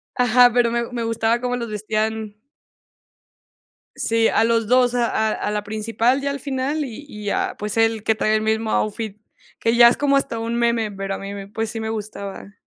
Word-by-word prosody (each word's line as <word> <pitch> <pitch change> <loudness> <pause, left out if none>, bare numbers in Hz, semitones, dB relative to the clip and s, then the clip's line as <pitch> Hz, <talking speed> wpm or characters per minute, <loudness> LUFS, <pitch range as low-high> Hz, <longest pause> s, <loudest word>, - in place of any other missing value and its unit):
Ajá, 245 0 +5
pero 240 -1 +3
me 235 0 -2
me 240 -1 -3
gustaba 230 +1 +1
cómo 245 0 -1
los 235 -2 -4
vestían 215 0 -2 1.6
Sí, 225 0 +1
a 225 - +3
los 230 -2 +1
dos, 250 0 +3
a 240 -1 +2
a 220 0 0
a - - -3
la 210 -1 -2
principal 225 +5 0
ya 280 - -1
al 280 0 -3
final, 280 +2 -2
y 270 +3 -9
y 210 -3 -5
a, - - -1
pues, 210 0 -3
él 225 -1 +2
que 220 - +2
trae 215 0 +1
el 215 - +1
mismo 220 0 0
outfit, 215 -1 -2 0.4
que 230 +1 +1
ya 235 0 +9
es 240 - -1
como 285 -1 +2
hasta 255 -4 0
un 230 +1 -3
meme, 235 -2 +1
pero 195 0 -4
a - - -5
mí 195 0 -7
me 200 -1 -7
pues, 225 +1 -3
sí 225 - -5
me 220 - -3
gustaba. 205 -2 -6
225 Hz, 215 wpm, -21 LUFS, 215-240 Hz, 1.6 s, ya